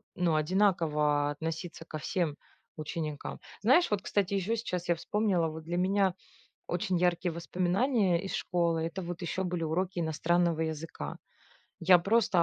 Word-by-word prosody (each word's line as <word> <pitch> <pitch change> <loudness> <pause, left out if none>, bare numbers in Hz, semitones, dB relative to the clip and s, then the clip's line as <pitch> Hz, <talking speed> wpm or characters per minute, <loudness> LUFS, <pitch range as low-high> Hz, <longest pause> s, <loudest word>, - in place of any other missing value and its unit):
ну, 175 -3 +2
одинаково 155 -4 +2
относиться 165 +2 -5
ко 155 - -6
всем 155 0 -1 0.4
ученикам. 155 -1 -4 0.2
Знаешь, 265 - +4
вот, 205 -2 +1
кстати, 200 0 0
еще 200 +3 0
сейчас 180 -6 -3
я 170 - +3
вспомнила, 185 -1 +1
вот 160 0 -6
для 170 +2 -3
меня 190 0 +2 0.5
очень 180 +1 0
яркие 175 0 +1
воспоминания 180 - +1
из 195 - -5
школы- 170 -2 0
это 165 +4 -3
вот 175 0 -6
еще 190 +2 -2
были 175 -2 -2
уроки 175 +3 -1
иностранного 170 +1 +1
языка. 160 - -4 0.7
Я 180 +1 +7
просто 195 -1 +3
175 Hz, 145 wpm, -30 LUFS, 160-190 Hz, 0.7 s, Я